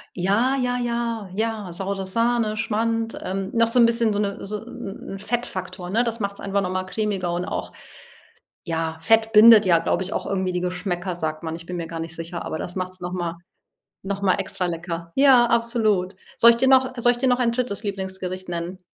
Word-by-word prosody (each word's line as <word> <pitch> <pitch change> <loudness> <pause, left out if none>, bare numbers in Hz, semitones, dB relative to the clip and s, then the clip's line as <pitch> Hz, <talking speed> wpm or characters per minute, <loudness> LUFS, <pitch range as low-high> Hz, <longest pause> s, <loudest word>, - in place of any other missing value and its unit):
Ja, 205 +9 +2
ja, 250 -1 0
ja, 235 -4 -2
ja. 220 -3 -2
Saure 195 +2 -4
Sahne, 230 +1 0
Schmand, 225 +1 -1
ähm, 195 +1 -3
noch 230 -1 +4
so 245 +2 +3
'n 235 - +8
bisschen 230 -1 +2
so 205 - -1
'ne 200 -1 -2
so 210 +2 -4
'n 200 -6 -8
'n 195 - -7
Fettfaktor, 190 -5 -4
ne? 230 +4 +3
Das 230 -1 -3
macht 200 -1 -2
es - - -14
einfach 200 0 -1
noch 185 -1 -2
mal 185 0 -1
cremiger 195 -3 -2
und 175 +1 -2
auch - - -4 1.0
ja, 160 -1 -2
Fett 225 +5 +3
bindet 220 -1 +8
ja, 170 -2 +5
glaube - - 0
ich, 190 - -1
auch - - -3
irgendwie 190 -1 -1
die 180 - -1
Geschmäcker, 180 0 -2
sagt 155 -1 -4
man. 160 0 -3
Ich 165 0 -9
bin 180 -1 -4
mir 170 - -3
gar 165 0 -6
nicht 165 +1 -5
sicher, 165 +1 -6
aber 160 - -4
das 175 - -5
macht 185 0 -3
es 185 - -9
noch 175 0 -5
mal 175 -2 -3 0.7
noch 200 +1 -3
mal 190 -2 +3
extra 180 - -3
lecker. 170 0 -5
Ja, 265 -3 +6
absolut. 225 -5 +1 0.2
Soll 235 -1 +8
ich 230 - 0
dir 265 +2 +2
noch 260 -1 +4
soll 240 0 +4
ich 240 - -6
dir 260 - +1
noch 250 0 +2
ein 235 -2 +2
3. 235 -3 -2
Lieblingsgericht 190 -2 -4
nennen? 175 +2 -4
200 Hz, 220 wpm, -23 LUFS, 180-230 Hz, 1.0 s, n